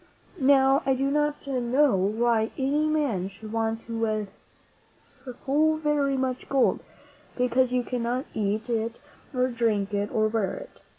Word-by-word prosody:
Now, 270 0 +5
I 270 0 +2
do 270 +2 0
not 295 0 0
know 260 0 +2
why 220 +4 +1
any 285 +3 +1
man 280 -12 0
should 215 +2 -10
want 225 0 -1 1.2
so 275 +4 -1
very 295 -3 0
much 260 -1 -2
gold, 270 -2 +2 0.6
because 250 0 +2
you 250 -1 +1
cannot 245 +2 -2
eat 215 +2 -1
it 230 -1 -2 0.3
or 255 -2 +1
drink 220 -4 0
It 205 0 -1
or 215 -1 +2
wear 215 -2 -1
it. - - -11
250 Hz, 135 wpm, -26 LUFS, 225-275 Hz, 1.2 s, Now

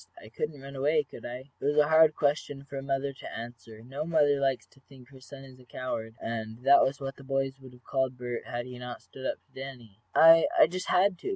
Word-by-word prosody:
I 110 - -12
couldn't 145 +4 -4
run 140 0 -9
away, 150 +3 +2
could 135 - -10
I?" 125 +3 -8
It - - -12
was 145 +2 +1
a 150 -1 +5
hard 160 0 +6
question 145 -1 -1
for 140 0 -10
a 135 - -3
mother 135 0 -2
to - - -8
answer. 115 -1 -10
No 135 +5 -5
mother 150 -3 +3
likes 135 -2 0
to 135 - -24
think 130 -2 -17
her 135 -1 -15
son 135 0 -12
a - - -19
coward, 115 -2 -5
and 115 +1 -5
that 140 +1 +7
was 140 +1 +1
what 135 -1 -5
the 140 - -12
boys 135 0 -2
would 130 -1 -13
have 125 0 -18
called 130 -2 -1
Bert 120 -1 -5
had 120 -1 -4
he 125 -1 -9
not 125 0 -7
stood 130 0 -7
up - - -2
to - - -38
Danny. 125 -6 -9 0.2
"I 165 0 +8
I - - +8
just 185 +3 -5
had 185 -1 +3
to!" - - -4
135 Hz, 250 wpm, -29 LUFS, 125-145 Hz, 0.2 s, I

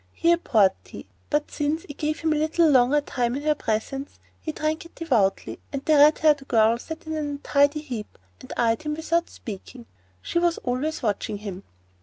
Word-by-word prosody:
He 335 - +2
abhorred 220 - +4
tea, - - -11 0.2
but, 295 0 0
since 300 +2 -1
it 290 - -9
gave 305 0 -1
him 320 -1 +2
a - - 0
little 315 +2 +2
longer 270 +1 +4
time 245 -3 -1
in 285 - -4
her 305 0 +3
presence, 270 +3 -3 0.2
he 315 - -4
drank 310 +1 -2
it 335 - -16
devoutly, 225 - 0
and 275 -1 -5
the 310 - +3
red 295 +1 +6
haired 295 -3 +3
girl 230 -1 +3
sat 320 +5 -8
in 315 - -4
an 300 -1 -2
untidy 285 +1 +1
heap 245 -8 -7 0.2
and - - -12
eyed 230 +1 +2
him 300 -1 -3
without 335 +2 0
speaking. 230 +3 -9 0.3
She 340 - -1
was 345 -1 +1
always 260 +5 -2
watching 210 -1 -1
him. 200 -2 -7
290 Hz, 195 wpm, -25 LUFS, 240-310 Hz, 0.3 s, red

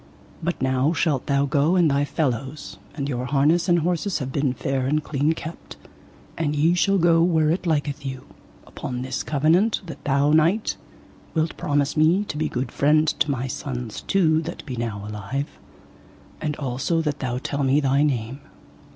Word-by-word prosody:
But 170 +1 -2
now 130 +4 +2
shalt 150 -6 0
thou 140 -1 +2
go 145 +4 +2
and 170 -5 +4
thy 140 +1 +2
fellows, 140 0 -3 0.2
and 140 -2 -3
your 125 -3 -2
harness 150 +6 +2
and 175 - +5
horses 175 +3 0
have 130 -3 -4
been 140 -2 +1
fair 130 +1 -2
and 150 +2 +1
clean 145 +2 +1
kept, 160 +1 -9 0.6
and 150 -2 -1
ye 160 +4 +3
shall 195 +3 +2
go 165 -2 +4
where 160 -3 +3
it 175 +1 -2
liketh 145 -3 -1
you, 130 -2 -6 0.4
upon 125 -1 -5
this 130 - -3
covenant, 160 +9 +2
that 165 - -9
thou, 140 +1 +2
knight, 165 +8 +3 0.6
wilt 160 0 0
promise 145 -1 0
me 165 +6 +4
to - - -4
be 155 +1 0
good 125 0 -3
friend 155 +2 +3
to 150 - +2
my 130 -2 -1
sons 125 -3 -5
two 160 -5 +2
that 165 - -7
be 130 -4 -5
now 110 -4 -4
alive, 105 +7 -5 0.8
and 150 -1 -2
also 140 +5 -1
that 150 -2 -2
thou 125 -2 -2
tell 140 +2 -3
me 135 +1 +3
thy 140 -1 +2
name. 130 -3 -1
145 Hz, 175 wpm, -23 LUFS, 135-160 Hz, 0.8 s, and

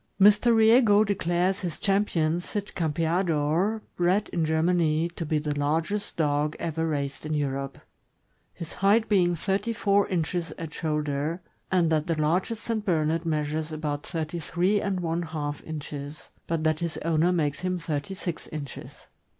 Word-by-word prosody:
Mr. 210 +4 +6
Riego 220 -1 +6
declares 185 -1 0
his 175 -4 -4
Champion 175 -5 +1
Cid 205 +3 -5
Campeador, 165 +4 +1
bred 185 +4 +1
in 170 - -1
Germany, 160 0 +2
to 170 -2 -6
be 155 - +1
the 150 0 -1
largest 165 +8 -1
dog 150 -1 +1
ever 165 0 -2
raised 140 -3 -3
in 155 0 -2
Europe— 135 -2 -2 0.7
his 170 - -8
height 210 +4 +3
being 180 -4 +3
thirty 195 +7 -1
four 205 -2 +2
inches 175 -1 -1
at 165 -1 -6
shoulder 150 +1 -1 0.2
— - - -41
and 175 -3 +3
that 155 +1 +1
the 165 -2 0
largest 185 +8 0
St. 225 -2 -2
Bernard 165 -3 0
measures 155 0 -1
about 150 -2 -3
thirty 165 0 -4
three 180 +6 +1
and 190 -2 -1
one 165 0 -1
half 150 -3 -4
inches, 150 -1 -7 0.2
but 165 -1 -1
that 155 -1 +1
his 170 -2 -3
owner 165 +1 +3
makes 150 -5 0
him 185 0 -1
thirty 165 +1 -3
six 175 -3 -5
inches. 145 -3 -8
165 Hz, 160 wpm, -27 LUFS, 155-190 Hz, 0.7 s, Mr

